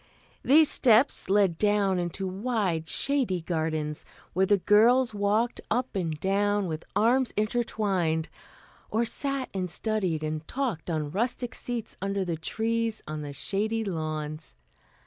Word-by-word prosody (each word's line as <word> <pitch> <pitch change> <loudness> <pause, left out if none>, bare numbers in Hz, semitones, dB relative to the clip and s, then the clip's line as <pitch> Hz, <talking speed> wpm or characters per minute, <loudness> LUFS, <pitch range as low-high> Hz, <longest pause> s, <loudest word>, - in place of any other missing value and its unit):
These 305 +3 +6
steps 240 -4 +4
led 195 -4 +3
down 205 -3 +2
into 175 +2 -3
wide 190 -5 -1
shady 265 -10 +1
gardens, 155 -2 -2 0.3
where 190 +2 +2
the 205 - +4
girls 225 +5 +4
walked 210 +4 0
up 245 +1 -1
and 165 -5 -2
down 205 +2 +1
with 160 -2 -4
arms 240 +5 +3
intertwined, 200 -7 0 0.6
or 230 +2 +1
sat 275 +2 -3
and 185 -2 -2
studied 185 -5 -1
and 155 0 -4
talked 245 - -3
on 155 -3 -2
rustic 240 +5 -2
seats 240 -3 -4
under 195 0 -1
the 170 -2 -2
trees 225 +6 -2
on 155 0 -4
the 145 -1 -6
shady 215 +9 -2
lawns. 155 - -4
200 Hz, 135 wpm, -27 LUFS, 165-230 Hz, 0.6 s, These